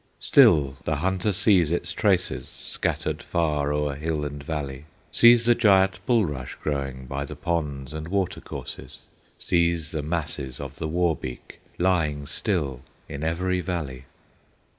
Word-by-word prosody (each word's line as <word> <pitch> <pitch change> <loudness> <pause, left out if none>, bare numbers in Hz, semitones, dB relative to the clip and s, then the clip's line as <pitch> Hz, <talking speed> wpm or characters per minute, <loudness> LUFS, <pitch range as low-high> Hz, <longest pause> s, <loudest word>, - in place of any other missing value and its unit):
Still 70 -3 +5
the 80 - 0
hunter 95 +6 0
sees 90 -4 +3
its 85 -1 -1
traces 90 - +1
Scattered - - -2
far 75 -4 0
o'er 75 -1 0
hill 75 +1 -2
and 70 0 -5
valley; 70 -2 -4 0.3
Sees 120 0 +6
the 120 - +6
giant 95 -5 +3
bulrush 75 - 0
growing 70 -3 -3
By 70 +2 -3
the 75 +1 -7
ponds 75 -4 -3
and 80 0 -5
water 95 0 -1
courses, - - -8 0.4
Sees 85 -3 +1
the 80 - -2
masses 75 -4 -3
of 70 0 -7
the 80 - -3
Wawbeek 80 -6 -2 0.2
Lying 80 -6 +1
still 70 -6 -2 0.3
in 70 +2 -6
every 90 +3 0
valley. 75 -8 -4
80 Hz, 140 wpm, -25 LUFS, 70-90 Hz, 0.4 s, Sees